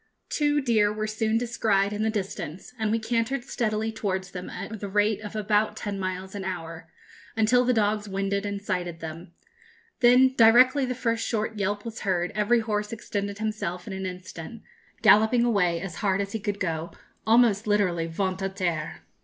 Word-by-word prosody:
Two 295 -1 +1
deer 220 -5 +3
were 215 0 -3
soon 220 +1 0
descried 215 -4 +1
in 210 - -3
the 220 - +2
distance, 195 -1 -5
and 220 -1 0
we 225 - +2
cantered 230 +3 -1
steadily 220 -2 -1
towards 190 -3 -3
them 180 0 -6
at 220 -1 -6
the 200 - -5
rate 210 +1 +1
of 210 0 -8
about 210 0 +1
ten 200 -2 -4
miles 185 0 -4
an 200 -2 -5
hour, 165 -3 -6 0.5
until 235 +3 +4
the 250 - +2
dogs 210 -2 +1
winded 195 +1 -1
and 200 -1 -4
sighted 175 -4 -3
them. 165 +2 -8 0.7
Then, 255 +1 +6
directly 255 +4 +6
the 250 - -2
first 230 -2 -1
short 220 -1 -2
yelp 205 +2 -1
was 230 0 -6
heard, 180 -3 0
every 215 +3 +2
horse 210 -1 -2
extended 205 -3 -4
himself 210 -5 -3
in 200 - -6
an 190 0 -3
instant, 185 +3 -8 0.4
galloping 220 +3 +6
away 180 -8 +2
as 175 -2 -6
hard 195 -2 +1
as 200 0 -2
he 220 - -3
could 205 -1 -3
go, 165 -2 -3 0.3
almost 225 -2 +4
literally 185 -5 +1
ventre 190 +3 -2
à 190 - -18
terre. 170 -5 -2
210 Hz, 180 wpm, -26 LUFS, 190-225 Hz, 0.7 s, Then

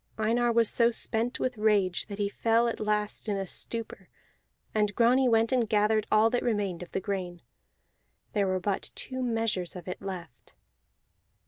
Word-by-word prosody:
Einar 235 +2 +2
was 230 -1 +4
so 235 +2 +4
spent 235 +1 -1
with 250 -4 -2
rage 205 -4 +2
that 200 -2 -7
he 205 -1 0
fell 230 +3 +2
at 230 - -3
last 210 0 -2
in 200 - 0
a 195 - -2
stupor; 230 +4 -4 0.6
and 210 -1 +1
Grani 250 +2 +4
went 225 +1 +3
and 245 -4 +1
gathered 215 0 +2
all 220 +1 +5
that 245 - +1
remained 205 -7 -1
of 175 - -9
the - - -1
grain. 185 -3 -4 0.9
There 200 -2 +1
were 185 0 0
but 195 +1 -2
two 260 0 -3
measures 225 -7 -1
of 180 -1 -9
it 180 - -5
left. 180 -8 -8
215 Hz, 175 wpm, -28 LUFS, 195-230 Hz, 0.9 s, all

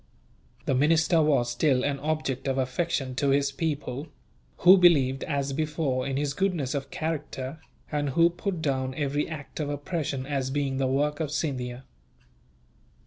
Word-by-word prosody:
The - - +1
minister 160 +4 +3
was 135 -6 +2
still 130 +1 +2
an 140 -1 -1
object 150 -3 -2
of 135 0 0
affection 130 0 -1
to 140 - +2
his 140 0 +2
people; 145 -2 -3 0.5
who 180 +2 +8
believed, 140 -8 +4
as 140 -2 -1
before, 150 -3 -1
in 135 -1 -2
his 145 -1 -1
goodness 165 -6 0
of 140 -1 -3
character, 155 -3 -4 0.3
and 145 -1 0
who 165 +5 +4
put 175 -1 -4
down 130 -2 -1
every 145 0 -1
act 155 -2 -7
of 150 -2 -2
oppression 145 -2 -3
as 135 -2 -2
being 135 -1 -1
the 135 -1 +1
work 145 +3 0
of 155 -3 -1
Scindia. 130 -5 -3
145 Hz, 155 wpm, -27 LUFS, 135-155 Hz, 0.5 s, who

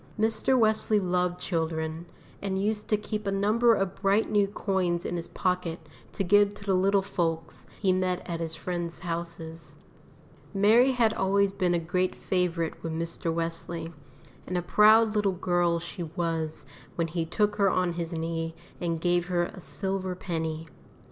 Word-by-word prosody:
Mr. 225 +4 +2
Wesley 215 -2 +3
loved 180 -1 0
children, 160 -1 -2 0.3
and 190 -1 -1
used 210 +1 -1
to 210 - +3
keep 210 0 -4
a - - +1
number 220 +4 +3
of 195 -2 -1
bright 200 +3 +2
new 205 -1 +3
coins 190 -4 -1
in - - -2
his 170 -1 -4
pocket 180 -3 -1 0.3
to 195 - -2
give 205 +2 +4
to - - -11
the 195 -1 +1
little 195 +1 +3
folks 165 -4 -3
he 190 -3 +3
met 185 -1 -1
at 170 -2 -3
his 165 -1 -2
friends' 170 0 -4
houses. 165 -3 -6 0.8
Mary 225 +7 +5
had 230 -3 +3
always 200 +1 +2
been 180 -3 +1
a - - +2
great 180 +2 -1
favourite 175 -3 -1
with 165 - -4
Mr. 165 0 -3
Wesley, 165 0 -4 0.5
and 180 - -1
a 175 - -1
proud 215 +4 +5
little 205 -2 +2
girl 175 -1 +1
she 175 +2 -7
was 165 -3 -2 0.3
when 170 - 0
he 165 +1 -2
took 205 +5 0
her 200 -2 +4
on 180 -1 +1
his 170 0 -4
knee 165 0 -3 0.2
and 165 -2 -2
gave 175 0 +1
her 175 -2 +1
a 180 - -7
silver 190 0 -2
penny. 160 -3 -3
180 Hz, 170 wpm, -28 LUFS, 165-200 Hz, 0.8 s, Mary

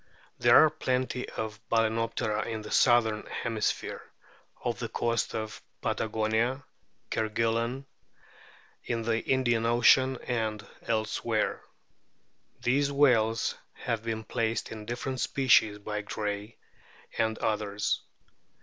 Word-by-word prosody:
There - - +7
are 155 - +2
plenty 130 -4 -2
of 110 -1 -5
Bal&noptera 115 -1 0
in 110 -2 -4
the 105 - -8
southern 115 -3 +4
hemisphere, 110 -2 -2 0.6
off - - -2
the - - -3
coasts 115 0 -1
of 110 -1 -4 0.2
Patagonia, 110 +4 0 0.5
Kerguelen, 115 +4 0 1.0
in 115 -1 -2
the 115 0 +1
Indian 120 -3 +2
ocean, 130 +3 +5
and 110 -4 -2 0.2
elsewhere. 110 0 0 1.0
These 140 +3 +2
whales 115 -6 +3 0.2
have 115 -3 -3
been 110 -1 -3
placed 110 +1 -2
in 105 -1 -8
different 125 +2 -3
species 120 -7 +3
by 105 0 -4
Gray 105 +1 -4 0.6
and 110 0 +1
others. 105 -1 -1
115 Hz, 105 wpm, -29 LUFS, 110-120 Hz, 1.0 s, There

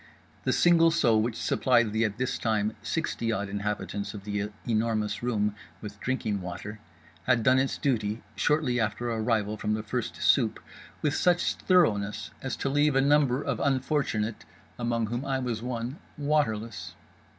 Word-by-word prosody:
The - - +2
single 170 -1 +5
seau 120 -10 +3
which 115 +1 -1
supplied 120 -4 +2
the 110 +1 +2
(at 105 -1 -3
this 130 +1 -1
time) 110 -1 0
sixty 115 -2 -2
odd 100 -2 -1
inhabitants 105 0 -3
of 100 - -8
The 105 0 -2 0.2
Enormous 110 -2 0
Room 105 -4 0 0.3
with 105 -1 -9
drinking 110 -6 -1
water 95 +4 -7 0.5
had 120 -3 +3
done 130 +2 +5
its 135 0 0
duty, 110 -5 -1
shortly 150 -5 +1
after 115 +2 -1
our 115 - -2
arrival 110 -2 0
from 105 +1 -1
the 110 - -4
first 105 - -3
soupe - - +3 0.4
with 145 - +2
such 175 -1 +2
thoroughness 105 - +1
as 130 - -3
to - - -3
leave 145 0 +2
a - - +5
number 140 -1 +3
of - - -2
unfortunate 130 -5 0 0.4
(among 120 -1 0
whom 120 +4 -3
I 135 -1 -1
was 120 -4 -2
one) 125 +2 -4 0.2
waterless. 115 - -1
115 Hz, 160 wpm, -28 LUFS, 105-135 Hz, 0.5 s, single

